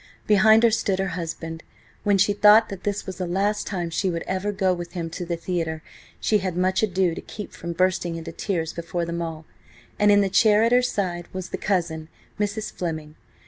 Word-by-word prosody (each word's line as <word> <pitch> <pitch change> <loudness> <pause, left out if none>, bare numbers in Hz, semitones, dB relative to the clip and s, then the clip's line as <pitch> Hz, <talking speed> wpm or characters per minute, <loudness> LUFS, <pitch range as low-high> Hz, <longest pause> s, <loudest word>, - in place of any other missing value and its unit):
Behind 220 +2 +5
her 230 - +6
stood 200 -3 0
her 195 0 -1
husband–when 165 +4 -4
she 205 +2 +3
thought 210 +2 +6
that 195 -2 -7
this 205 0 -2
was 190 -1 -7
the 180 - -2
last 200 +4 0
time 175 -4 -3
she 190 +3 0
would 170 -1 -3
ever 190 +2 -1
go 190 -2 +1
with 175 -1 -6
him 165 -3 -4
to 175 +1 -5
the 170 - -1
theatre 165 -2 -3 0.4
she 210 - +2
had 185 -2 -3
much 185 +1 +2
ado 190 -4 +1
to - - -6
keep 210 -2 -8
from 170 0 -5
bursting 180 -1 +1
into 165 0 -6
tears 165 -2 -2
before 170 0 -3
them 170 0 -3
all–and 165 +5 -3
in 205 0 +6
the 200 - +2
chair 210 +2 +4
at 230 - +3
her 250 0 +5
side 180 -8 -2
was 185 -1 -5
the - - -3
cousin, 165 -5 -1 0.3
Mrs. 210 +1 -2
Fleming. 155 -3 -5
185 Hz, 205 wpm, -24 LUFS, 170-205 Hz, 0.4 s, her